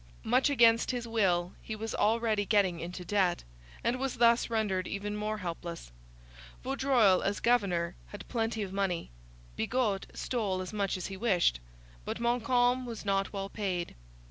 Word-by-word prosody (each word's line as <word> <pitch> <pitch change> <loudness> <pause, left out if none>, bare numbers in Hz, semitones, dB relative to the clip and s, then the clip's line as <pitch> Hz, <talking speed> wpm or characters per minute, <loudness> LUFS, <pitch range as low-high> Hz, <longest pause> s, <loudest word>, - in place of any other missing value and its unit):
Much 255 +5 +3
against 230 -4 +4
his 245 -2 -2
will 185 -6 +1
he 220 - -5
was 220 +1 -5
already 220 -1 +2
getting 195 -5 +2
into 180 +2 -6
debt, 190 -3 +1 0.4
and 245 +2 0
was 270 -1 -2
thus 235 0 +4
rendered 205 -5 0
even 205 +1 -4
more 215 +1 -2
helpless. 170 - -6 0.7
Vaudreuil, 260 -8 +3
as 200 +1 -1
governor, 185 -8 +1
had 205 - -10
plenty 225 -2 -1
of 190 -1 -6
money. 190 - -1 0.4
Bigot 220 - 0
stole 210 -7 -1
as 185 +2 -5
much 200 -3 -1
as 180 - -5
he 195 - -5
wished. 185 - +2 0.4
But - - -4
Montcalm 245 +1 +2
was 230 -3 -7
not 195 -1 0
well 195 -1 -4
paid. 185 -5 -3
210 Hz, 155 wpm, -30 LUFS, 185-235 Hz, 0.7 s, against